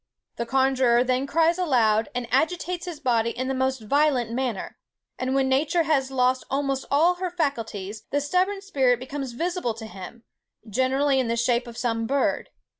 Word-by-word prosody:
The 235 - -3
conjuror 260 -2 +3
then 255 +2 0
cries 330 +4 +2
aloud, 230 -10 +2
and 245 -1 -2
agitates 350 +5 0
his 335 -4 -6
body 235 -5 +1
in 255 +2 -4
the 265 - -1
most 260 -1 -1
violent 260 0 +1
manner; 245 -4 -3 0.4
and 255 +1 -1
when 270 -1 +2
nature 295 +6 +2
has 280 -4 +1
lost 255 -1 +1
almost 275 -1 -1
all 335 +6 +3
her 365 0 -2
faculties, 225 - -3
the 285 - +1
stubborn 365 +7 0
spirit 265 -11 +2
becomes 265 0 -5
visible 340 -4 -2
to 225 0 -8
him, 220 +3 -10 0.4
generally 265 +5 +1
in 255 - 0
the 230 0 -1
shape 240 +1 +1
of 235 0 -10
some 225 -2 -1
bird. 275 +2 0
265 Hz, 175 wpm, -25 LUFS, 235-290 Hz, 0.4 s, conjuror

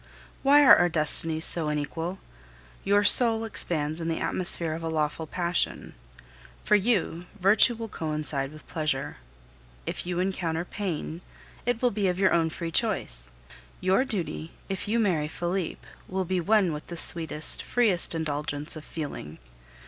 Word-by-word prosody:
Why 285 +2 +5
are - - +9
our 175 - +2
destinies 160 0 +3
so 165 -3 -2
unequal? 150 +5 -4 0.7
Your 205 +1 +2
soul 225 +1 +5
expands 160 -6 -2
in 165 - -4
the 165 - -2
atmosphere 175 -3 0
of 165 - -6
a 165 - -4
lawful 160 0 -2
passion. 175 +2 -2 0.7
For 210 - +3
you, 190 -5 -1
virtue 210 +6 +6
will 225 0 -6
coincide 150 -6 -4
with 155 0 -15
pleasure. 150 - -3 0.7
If - - -5
you 180 -1 -2
encounter 175 -3 -2
pain, 175 -4 -5 0.5
it 245 0 -1
will 245 - +3
be 200 -1 -1
of 180 -1 -1
your 190 0 +2
own 165 -1 +1
free 165 +1 -6
choice. - - -1 0.5
Your 190 +7 +2
duty, 180 -8 -5 0.2
if 195 +1 -4
you 220 +3 0
marry 180 -9 0
Felipe, 175 +2 -4 0.2
will 190 0 -3
be 185 0 -1
one 195 -2 +2
with 150 - -8
the 170 - -8
sweetest, 160 -2 +5
freest 205 -9 +1
indulgence 150 -1 -4
of 155 - -9
feeling. 145 - -7
170 Hz, 155 wpm, -26 LUFS, 155-195 Hz, 0.7 s, are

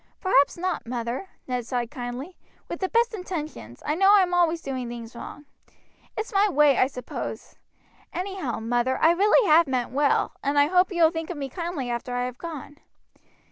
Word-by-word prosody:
"Perhaps 285 -7 +3
not, 360 -7 -2
mother," 240 +9 -4 0.2
Ned 250 -2 -3
said 245 -2 -2
kindly. 260 +5 -6 0.3
"With - - -5
the 375 - -1
best 465 0 +2
intentions, 310 - -6
I 300 - +1
know 390 +5 +5
I 395 - +6
am 360 -1 -2
always 340 -1 +3
doing 260 -5 -4
things 235 0 -8
wrong. 290 +5 -9 0.7
It's 430 +1 -4
my 405 +1 +4
way, 295 -4 +4
I 255 - +5
suppose. 250 -3 -7 0.6
Anyhow, 365 - -3
mother, 240 +3 0
I 325 - +5
really 410 +5 +4
have 320 +1 +6
meant 255 -3 -1
well, 285 +2 +2
and 280 +1 0
I 285 - +6
hope 360 +5 +3
you 345 -2 +2
will 320 - +6
think 325 -1 -5
of 350 - -5
me 275 -1 -4
kindly 330 -5 -4
after 245 +1 -3
I 245 0 0
have 250 0 -6
gone." 300 -3 -7
295 Hz, 190 wpm, -25 LUFS, 250-360 Hz, 0.7 s, I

